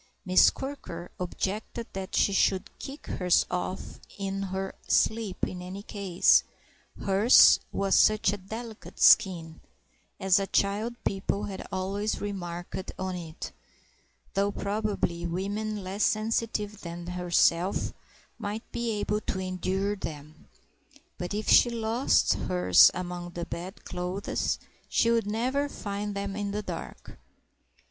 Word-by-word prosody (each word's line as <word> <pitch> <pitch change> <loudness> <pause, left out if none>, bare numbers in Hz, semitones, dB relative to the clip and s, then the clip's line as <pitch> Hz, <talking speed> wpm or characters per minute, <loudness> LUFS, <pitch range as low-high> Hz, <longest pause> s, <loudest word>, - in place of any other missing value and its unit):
Miss 185 0 +6
Quirker 220 -11 -7
objected 200 +5 -3
that 195 0 -5
she 200 - +3
should 195 0 +2
kick 275 +2 -8
hers 180 -1 +2
off 180 +1 -4 0.2
in 195 0 -3
her 190 0 -3
sleep 220 -4 +1
in 180 - -6
any 185 +3 -7
case, 195 -4 +3 0.6
hers 200 +5 +7
was 195 -1 0
such 215 -2 +4
a - - -3
delicate 220 +3 -9
skin 170 -7 +5 0.6
(as 190 0 +4
a 195 - -2
child 210 +5 0
people 195 +1 -1
had 195 -2 -6
always 195 +3 -2
remarked 180 -2 -5
on 185 0 -3
it), 165 -2 -7 0.8
though 200 0 +1
probably 200 -5 -2
women 205 +4 -3
less 195 +3 -2
sensitive 215 -1 0
than 170 0 -7
herself 180 0 +1 0.5
might 210 +1 -4
be 235 -1 -2
able 210 +1 -1
to 190 - -3
endure 190 +2 -1
them. 155 -4 -8 0.7
But 180 +3 -3
if 215 - -3
she 240 - +7
lost 230 +2 +2
hers 90 -2 +5
among 175 -1 -5
the 170 -1 -4
bedclothes 180 +1 -3 0.3
she 230 - +3
would 230 -3 +1
never 255 +7 0
find 205 -3 -4
them 200 0 -3
in 205 -1 -2
the 210 +1 -3
dark. 175 -4 -8
195 Hz, 125 wpm, -28 LUFS, 180-210 Hz, 0.8 s, hers